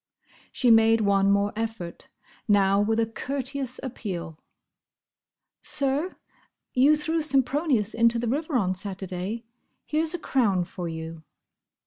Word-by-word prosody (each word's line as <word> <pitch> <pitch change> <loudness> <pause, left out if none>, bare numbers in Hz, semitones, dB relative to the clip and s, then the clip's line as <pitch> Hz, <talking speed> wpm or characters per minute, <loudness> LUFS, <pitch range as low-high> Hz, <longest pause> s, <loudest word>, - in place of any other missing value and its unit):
She 245 -2 +3
made 225 0 +5
one 200 -1 +3
more 200 +1 +2
effort: 220 -6 -5 0.4
now 200 -1 +4
with 220 +2 +1
a 225 - +3
courteous 265 +2 -3
appeal. 180 - -5 1.3
"Sir!—You 285 -1 0
threw 320 +2 0
Sempronius 275 -5 +1
into 230 +1 +3
the 235 +1 -2
river 295 +5 -1
on 185 -5 +1
Saturday—here's 210 - -4
a - - -2
crown 220 - +1
for 175 0 -6
you." 160 0 -7
225 Hz, 110 wpm, -26 LUFS, 195-270 Hz, 1.3 s, made